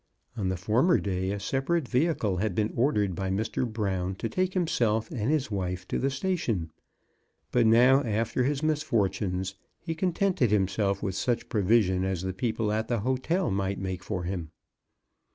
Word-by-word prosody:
On 95 -4 -1
the 95 - -1
former 120 - +3
day 95 -1 -2
a 100 +1 -2
separate 135 - -1
vehicle 125 - +1
had 100 -1 -1
been 105 0 0
ordered 105 -7 +2
by 95 +2 -3
Mr. 110 +4 -1
Brown 95 -4 -2
to 115 - -3
take 185 - -1
himself 120 - +1
and 110 +1 -2
his 150 -6 0
wife 90 -2 -3
to - - -1
the 135 - +1
station, 135 - -1 0.8
but 120 -2 +4
now, 125 +5 +6
after 115 +1 0
his 140 +2 0
misfor 145 -11 +1
tunes, 95 -1 -3 0.3
he 165 -1 -4
contented 180 - +1
himself 100 0 +1
with 95 -2 -1
such 120 +5 -1
provision 100 -3 +2
as 95 -2 -2
the 95 0 -2
people 110 +1 -1
at 110 +1 -1
the 120 -4 0
hotel 130 - 0
might 95 0 -1
make 95 -1 -4
for 95 -4 -3
him. 85 -3 -4
110 Hz, 170 wpm, -28 LUFS, 95-130 Hz, 0.8 s, now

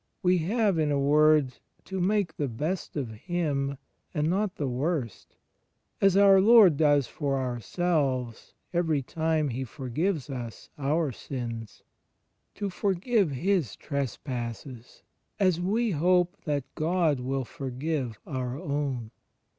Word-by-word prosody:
We 180 0 +4
have, 200 +1 +1
in 150 -2 +1
a 145 - +2
word, 150 -2 +4 0.3
to 190 0 -4
make 200 -2 +1
the 145 - -1
best 155 +10 -3
of 130 -6 -3
him 140 - -2 0.4
and 150 0 +1
not 195 +1 0
the 145 - -2
worst 130 - -3 0.7
(as 195 -1 +5
our 195 -1 +7
Lord 210 -6 +7
does 145 -2 +3
for 140 +1 -2
ourselves 130 - -1 0.2
every 160 -5 +1
time 160 +1 0
He 130 +2 -3
forgives 145 - -2
us 120 -5 -7
our 150 +1 0
sins), 115 -3 -6 0.7
to 200 -1 -3
forgive 200 +1 +1
his 160 - 0
trespasses 125 -2 -5 0.4
as 185 -4 +2
we 220 +5 +1
hope 180 +3 +2
that 145 -3 0
God 160 -3 +1
will 130 +1 -2
forgive 130 -2 -3
our 130 -1 -3
own. 140 -8 -3
150 Hz, 125 wpm, -28 LUFS, 130-180 Hz, 0.7 s, our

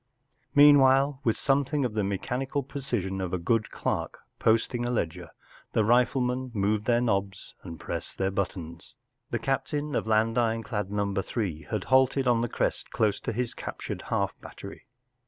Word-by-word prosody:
Meanwhile, 140 -1 +6
with 115 - +1
something 140 0 +1
of 120 - -2
the 105 - 0
me¬ 100 -1 -1
chanical 135 +2 -3
precision 110 -10 -3
of 95 -1 -3
a - - +2
good 110 +5 0
clerk - - -3 0.2
posting 115 +2 +2
a 120 - -1
ledger, 90 -6 -2 0.4
the 110 - +3
riflemen 125 +2 +2
moved 105 +1 +1
their 120 0 +3
knobs 100 -4 -2
and 85 -3 -9
pressed - - -6
their 95 0 0
buttons.... 90 0 -5 0.3
The 120 - -1
captain 145 +4 -2
of - - 0
I^and 110 +1 +2
Ironclad 115 -3 -1
Number 100 -1 -1
Three 85 -10 -4
had 105 -3 -2
halted 130 0 +3
on 120 -2 +3
the 120 - -1
crest - - -1
close 105 -2 +1
to - - -3
his 120 +1 -2
captured - - -6
half - - +1
battery. - - -11
115 Hz, 165 wpm, -27 LUFS, 100-130 Hz, 0.4 s, Meanwhile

